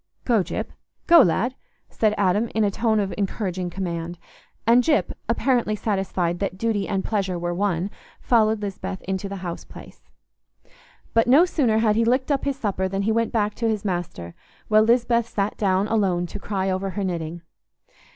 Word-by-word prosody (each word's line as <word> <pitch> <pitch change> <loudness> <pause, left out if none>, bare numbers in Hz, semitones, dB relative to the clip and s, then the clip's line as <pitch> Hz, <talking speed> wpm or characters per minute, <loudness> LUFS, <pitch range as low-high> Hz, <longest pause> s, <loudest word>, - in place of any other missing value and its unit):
"Go, 230 -5 +3
Gyp; - - -4 0.3
go, 340 0 +8
lad!" 220 +9 +2 0.5
Adam 210 -1 +2
said, - - -14
in 220 - +3
a 205 - +2
tone 220 +1 +1
of 195 -2 -1
encouraging 185 -3 -2
command; 175 -2 -4 0.5
and 235 +2 +5
Gyp, 310 +1 +1 0.2
apparently 240 -5 +1
satisfied 190 -5 -1
that 195 -2 -2
duty 210 -2 -1
and 195 -2 -1
pleasure 195 -4 -1
were 175 0 -2
one, 190 0 -1 0.3
followed 220 -3 +2
Lisbeth 190 -1 -5
into 190 +1 -3
the 200 - -5
house 170 -1 -5
place. - - -14 1.0
But 230 0 +3
no 285 +8 +7
sooner 260 -11 +1
had 220 -1 +3
he 230 - +3
licked 255 +5 +1
up 280 -1 0
his 280 -1 -1
supper 195 -5 -1
than 195 +1 -2
he 220 - +1
went 230 +1 +1
back 210 -3 0
to 230 - +2
his 215 -2 -2
master, 175 - -4 0.4
while 215 0 +6
Lisbeth 235 0 +2
sat 200 0 -1
down 195 0 +1
alone 190 -6 +1
to 190 +4 -7
cry 195 -2 -2
over 190 +1 -2
her 200 +1 -3
knitting. 170 -2 -4
205 Hz, 180 wpm, -23 LUFS, 185-225 Hz, 1.0 s, go